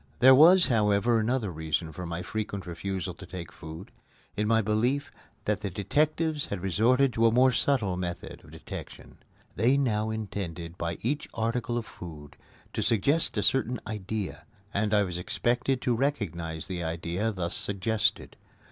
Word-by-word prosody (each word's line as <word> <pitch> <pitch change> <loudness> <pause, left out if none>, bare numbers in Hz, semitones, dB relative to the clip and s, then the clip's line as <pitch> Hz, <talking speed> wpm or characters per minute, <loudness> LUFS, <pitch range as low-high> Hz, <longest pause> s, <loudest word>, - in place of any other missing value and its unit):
There 130 +1 +8
was, 170 +6 +8
however, 110 -1 +3
another 110 -2 0
reason 80 0 -2
for 90 +1 -6
my 85 +1 -4
frequent 100 0 -4
refusal 90 +1 -4
to 95 - -11
take 90 -3 -7
food, 80 +8 -10 0.4
in 105 0 0
my 115 0 +4
belief 115 +6 0 0.3
that 105 -1 0
the 100 - -2
detectives 150 - 0
had 100 - -4
resorted 115 +9 +3
to 115 0 +4
a - - +4
more 130 +3 +5
subtle 115 -8 +1
method 90 -1 -5
of - - -16
detection. - - -10 0.4
They 120 +7 +3
now 110 -6 +1
intended 90 -6 -5
by 85 -2 -3
each 145 +6 -1
article 120 +1 -1
of 115 - -3
food 75 -7 -10 0.4
to - - -1
suggest 140 +10 +2
a - - +1
certain 125 -3 +1
idea, 105 -1 -5 0.3
and 105 +1 0
I 105 -1 +4
was 90 -2 -4
expected 125 +7 0
to 125 - +2
recognize 85 - -2
the 90 -2 -4
idea 85 +6 -2
thus 90 -4 +1
suggested. 105 +2 0
105 Hz, 160 wpm, -28 LUFS, 90-120 Hz, 0.4 s, There